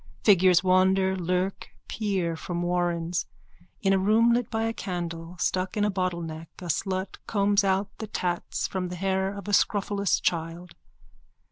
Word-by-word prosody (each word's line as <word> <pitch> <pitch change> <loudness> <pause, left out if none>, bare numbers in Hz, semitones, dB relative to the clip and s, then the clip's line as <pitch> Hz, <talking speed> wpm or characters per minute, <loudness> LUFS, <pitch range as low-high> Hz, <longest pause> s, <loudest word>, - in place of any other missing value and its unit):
Figures 185 -3 +5
wander, 190 +1 +3
lurk, 185 +1 -2 0.2
peer 190 -6 -1
from 175 +1 -4
warrens. 175 -1 -1 0.6
In 195 -1 +4
a 190 - +3
room 220 +4 +4
lit 240 -2 0
by 225 0 -1
a 225 0 0
candle 175 -3 -5
stuck 185 +2 -1
in 205 - +2
a 210 - +1
bottleneck 170 -4 -3
a 180 -3 -7
slut 185 +4 -2
combs 205 -1 +2
out 195 +1 0
the 220 - -5
tatts 175 -4 -2
from 185 -2 -3
the 180 - -5
hair 190 +1 0
of 200 -1 -8
a 205 - -2
scrofulous 200 -1 +2
child. 170 +1 -2
185 Hz, 155 wpm, -27 LUFS, 175-200 Hz, 0.6 s, Figures